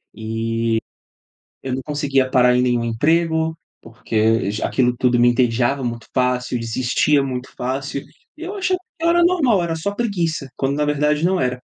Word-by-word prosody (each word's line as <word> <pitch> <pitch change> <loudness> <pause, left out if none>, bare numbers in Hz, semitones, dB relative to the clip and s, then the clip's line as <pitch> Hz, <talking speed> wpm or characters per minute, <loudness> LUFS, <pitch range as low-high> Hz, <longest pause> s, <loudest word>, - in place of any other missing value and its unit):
e 115 +1 -4 1.1
eu 130 -1 -3
não 130 - -4
conseguia 140 -3 0
parar 125 -1 +4
em 125 - +3
nenhum 120 -2 +1
emprego, 160 +6 +1 0.2
porque 115 -1 0
já 105 - -2
aquilo 125 -2 +1
tudo 120 -1 +2
me 120 - +6
entediava 120 +2 +1
muito 115 -1 -4
fácil, 125 -1 0
eu - - -3
desistia 130 +5 +1
muito 130 -1 -4
fácil. 135 +2 -3 0.3
E 325 - -12
eu 385 +4 -5
achava 370 -1 0 0.2
que 330 - -5
eu - - +5
era 345 0 +4
normal, 275 - +3
era 165 -1 -2
só 200 +6 -3
preguiça, 170 - -2
quando 140 +1 -1
na 150 - +1
verdade 150 +2 +1
não 185 -2 +2
era. 125 0 -1
135 Hz, 180 wpm, -20 LUFS, 120-160 Hz, 1.1 s, me